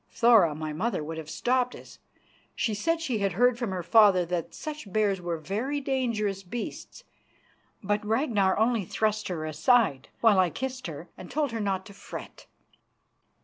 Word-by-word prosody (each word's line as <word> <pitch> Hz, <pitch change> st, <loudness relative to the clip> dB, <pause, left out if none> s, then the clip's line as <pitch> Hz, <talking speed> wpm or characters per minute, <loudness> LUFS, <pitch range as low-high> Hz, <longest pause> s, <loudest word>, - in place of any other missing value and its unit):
Thora, 225 Hz, -10 st, +5 dB
my 155 Hz, 0 st, -4 dB
mother, 190 Hz, +1 st, -1 dB
would 160 Hz, +1 st, -5 dB
have 155 Hz, -1 st, -8 dB
stopped 250 Hz, +6 st, 0 dB
us -, -, -13 dB, 0.6 s
she 220 Hz, -, 0 dB
said 330 Hz, +11 st, 0 dB
she 250 Hz, -9 st, -1 dB
had 195 Hz, -3 st, 0 dB
heard 245 Hz, +4 st, +3 dB
from 240 Hz, -4 st, -2 dB
her 185 Hz, -2 st, -3 dB
father 190 Hz, -1 st, +5 dB
that 175 Hz, -1 st, -3 dB
such 300 Hz, -10 st, -7 dB
bears 200 Hz, -2 st, +1 dB
were 175 Hz, -1 st, -2 dB
very 220 Hz, -, -2 dB
dangerous 230 Hz, -8 st, -1 dB
beasts 235 Hz, -, -7 dB, 0.8 s
but 205 Hz, +2 st, 0 dB
Ragnar 215 Hz, -4 st, +1 dB
only 225 Hz, 0 st, +2 dB
thrust 215 Hz, +3 st, -1 dB
her 165 Hz, -4 st, -3 dB
aside, 155 Hz, -, +2 dB
while 220 Hz, -4 st, +5 dB
I 185 Hz, -2 st, +4 dB
kissed 255 Hz, -, -5 dB
her 165 Hz, +1 st, -8 dB
and 185 Hz, -, -9 dB
told 295 Hz, -3 st, -1 dB
her 230 Hz, -, -3 dB
not 195 Hz, -2 st, -1 dB
to 200 Hz, -, -12 dB
fret. 195 Hz, -, -10 dB
205 Hz, 170 wpm, -27 LUFS, 180-240 Hz, 0.8 s, Thora